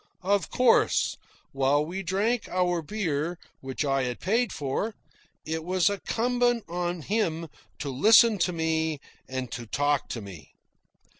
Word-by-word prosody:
Of 195 -1 +1
course, 250 -2 +3 0.4
while 135 +2 +2
we 185 +4 -4
drank 205 +6 0
our 180 -1 +1
beer, 165 -3 -2 0.2
which 135 +2 -3
I 135 -1 +1
had 125 -1 -4
paid 225 +3 +1
for, 150 +10 -2 0.5
it 160 +1 -3
was 185 +2 +2
incumbent 240 +3 0
on 175 -1 -3
him 165 -6 -1 0.3
to 145 - -4
listen 215 - +6
to 175 +1 +2
me 160 -2 -1 0.3
and 130 -2 -4
to 120 0 -6
talk 145 +4 0
to 120 - -4
me. 95 -7 -11
170 Hz, 140 wpm, -27 LUFS, 145-205 Hz, 0.5 s, listen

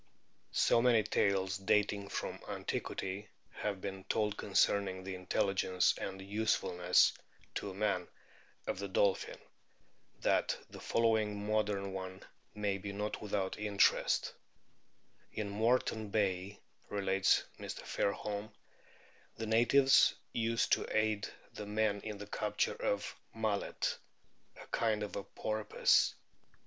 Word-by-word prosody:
So 115 - +4
many 120 -3 +5
tales 95 -2 +1
dating 100 0 +1
from - - -4
antiquity 95 +2 -4 0.2
have 100 -3 -3
been 95 -1 -5
told 105 -1 0
concerning 95 -2 +1
the 95 0 -5
intelligence 95 0 +1
and 95 0 -5
usefulness 95 -3 +2 0.4
to 100 - -3
man 100 -3 0 0.6
of - - -3
the 100 - -3
dolphin, 95 0 +1 0.8
that - - +2
the - - -9
following 110 -3 +1
modern 105 -2 0
one 95 0 -6 0.3
may 100 -2 -1
be 100 +1 -5
not 105 +1 -3
without 100 -2 -2
interest: 105 -1 +2 1.0
"In 105 -1 -3
Moreton 110 0 +1
Bay," 100 -1 0 0.3
relates 95 -1 +2 0.2
Mr. - - -6
Fairholm,* 105 +1 -2 0.8
"the 115 - -4
natives 120 +5 +5 0.2
use 115 0 +1
to - - +2
aid 110 -1 +1 0.3
the 105 - -7
men 105 -1 +1
in 105 -2 -5
the 105 - -7
capture 105 - -1
of 100 0 -2
' - - -38
Mullet,' 110 -3 -1 0.6
a - - -10
kind 110 -2 0
of 105 - -5 0.2
' - - -40
Porpoise.' 110 0 +2
100 Hz, 120 wpm, -34 LUFS, 95-110 Hz, 1.0 s, many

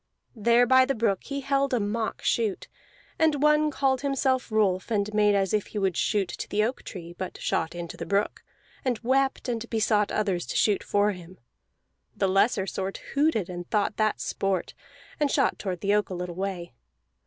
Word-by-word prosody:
There 235 +2 +4
by 260 +1 +6
the 270 +1 -1
brook 215 -4 0
he 280 0 -4
held 275 0 +1
a - - +1
mock 215 +2 -2
shoot; 220 -4 0 0.5
and 305 -3 +2
one 300 0 +4
called 270 -3 +1
himself 265 -3 0
Rolf 200 -3 +1
and 210 -1 0
made 210 -1 +4
as 195 -1 +1
if 210 -2 0
he - - -7
would 190 -3 +1
shoot 205 -1 +1
to - - -6
the 210 +1 +1
oak 240 +4 -2
tree, 170 -3 -8
but 185 +1 -6
shot 165 +1 -1
into 170 -1 -6
the - - -5
brook, 200 +1 0 0.4
and 250 -3 0
wept, 270 +3 +1
and 235 -1 -3
besought 215 -2 +1
others 195 -5 -1
to - - -4
shoot 210 -2 +2
for 205 +1 +2
him. 180 -1 -11 0.8
The 195 - +2
looser 195 +1 +2
sort 195 0 -4 0.2
hooted 280 - +2
and 175 -1 -7
thought 210 0 0
that 215 -1 +1
sport, 195 -2 -2 0.5
and 295 -1 +2
shot - - +1
toward 185 -4 -4
the 200 0 +1
oak 210 0 +1
a 185 - -4
little 180 0 -4
way. 185 -5 -4
210 Hz, 190 wpm, -26 LUFS, 190-255 Hz, 0.8 s, by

